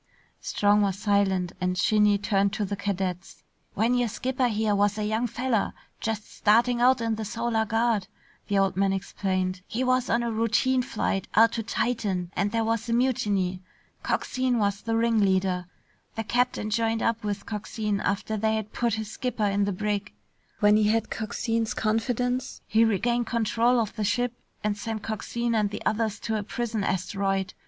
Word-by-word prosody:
Strong 205 0 +2
was 195 -2 +1
silent 195 -3 +1
and 180 0 0
Shinny 210 +2 +4
turned 200 0 +1
to 210 - -1
the 200 +1 -3
cadets. 190 -2 -3 0.3
"When 225 +4 +2
your 245 -1 +2
skipper 255 +3 0
here 215 -2 +1
was 205 +1 +2
a 210 - -1
young 220 +3 0
feller 240 -2 -1 0.3
just 215 -1 -3
starting 235 +3 +2
out 255 0 +4
in 225 -1 0
the 220 - -3
Solar 230 +1 -1
Guard," 225 -3 +1 0.4
the 200 - +1
old 195 -2 +2
man 195 0 +2
explained, 185 -1 -2
"he 245 +3 -2
was 255 -1 +1
on 235 +1 +2
a 235 - -1
routine 230 +4 +2
flight 200 -5 -2
out 225 +1 +6
to 230 - -2
Titan 205 -6 -1
and 200 +1 0
there 230 0 +1
was 225 +1 -1
a - - +1
mutiny. 205 -7 +1 0.4
Coxine 255 -1 0
was 200 -2 0
the 225 0 -1
ringleader. 190 -6 +2 0.5
The 225 - -2
captain 240 -2 0
joined 225 0 +1
up 230 -1 0
with 205 -1 -3
Coxine 210 -1 -3
after 200 +3 -1
they 220 +1 +1
had 215 -1 -4
put 235 -3 0
his 220 -1 -5
skipper 250 -4 -2
in 200 0 +1
the 200 - -1
brig. 205 - -2 0.5
When 210 0 +6
he 215 - +3
had 220 +1 +1
Coxine's 225 0 -2
confidence, 245 +3 -1
he 220 +1 +4
regained 235 +2 +1
control 235 +1 +2
of 220 -2 -2
the 215 - -2
ship 245 +4 0 0.3
and 210 -1 0
sent 215 +1 -5
Coxine 235 +2 -2
and 210 -2 +2
the 205 - -7
others 220 -1 0
to 220 -1 -1
a - - -2
prison 225 0 -3
asteroid. 195 +1 -1
215 Hz, 180 wpm, -26 LUFS, 200-230 Hz, 0.5 s, out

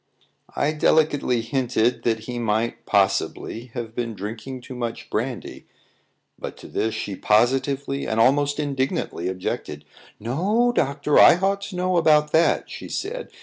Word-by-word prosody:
I 145 - +1
delicately 150 -5 +2
hinted 120 -1 0
that 115 -2 +1
he 120 +2 -5
might, 115 0 -1
possibly, 100 +3 0
have 115 -2 -5
been 115 -2 -3
drinking 110 +6 -6
too 130 - -9
much 120 -2 -5
brandy; 120 +2 -4 0.7
but - - -7
to - - -11
this 110 0 -2
she 100 - -4
positively 135 +6 +1
and 110 0 -1
almost 145 +4 +3
indignantly 135 - -2
objected. 95 0 -4 0.3
"No, 195 - +1
doctor; 140 +2 +2
I - - +9
ought 195 +2 0
to 195 - -8
know 180 0 +1
about 150 -2 +4
that," 165 +1 +3
she - - -8
said. 475 +6 -4
130 Hz, 145 wpm, -23 LUFS, 115-150 Hz, 0.7 s, I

